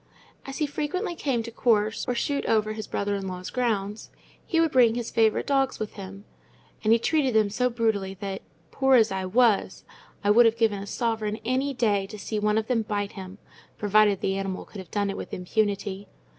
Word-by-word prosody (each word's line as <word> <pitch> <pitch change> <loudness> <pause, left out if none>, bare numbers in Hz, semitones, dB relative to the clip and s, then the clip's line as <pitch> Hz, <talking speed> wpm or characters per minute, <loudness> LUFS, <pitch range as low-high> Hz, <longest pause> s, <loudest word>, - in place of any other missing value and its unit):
As 270 - -6
he 305 - +1
frequently 305 +7 -3
came 270 -8 -1
to 230 - -7
course 220 -2 +1
or 245 - 0
shoot 280 +3 -1
over 215 -1 +2
his 215 -1 -6
brother 205 0 -2
in 195 -1 -4
law's 185 0 -6
grounds, 215 -4 -2 0.4
he 330 - +1
would 325 -2 +3
bring 240 -3 +5
his 240 -1 -4
favourite 220 -1 +2
dogs 270 -2 +1
with 215 -1 -5
him; 195 0 -9 0.6
and 215 - +3
he 230 - +7
treated 270 0 +1
them 215 -2 +3
so 250 +4 +1
brutally 220 -5 -1
that, 195 -1 -5 0.3
poor 265 -1 +3
as 225 -3 +4
I 190 -1 -2
was, 220 -2 +2 0.4
I 205 - +4
would 235 +2 +7
have 225 0 +1
given 220 -3 +1
a 200 - -8
sovereign 220 -2 -2
any 265 +3 0
day 205 -5 +1
to 215 - -9
see 215 +1 -3
one 210 +1 +1
of 220 - 0
them 235 -1 +1
bite 205 -2 -3
him, 190 -1 -9 0.4
provided 205 -1 +3
the 195 0 0
animal 195 -1 -4
could 205 - -10
have 185 -3 -10
done 205 -1 -1
it 195 - -6
with - - -6
impunity. 200 +1 -2
215 Hz, 210 wpm, -26 LUFS, 200-245 Hz, 0.6 s, he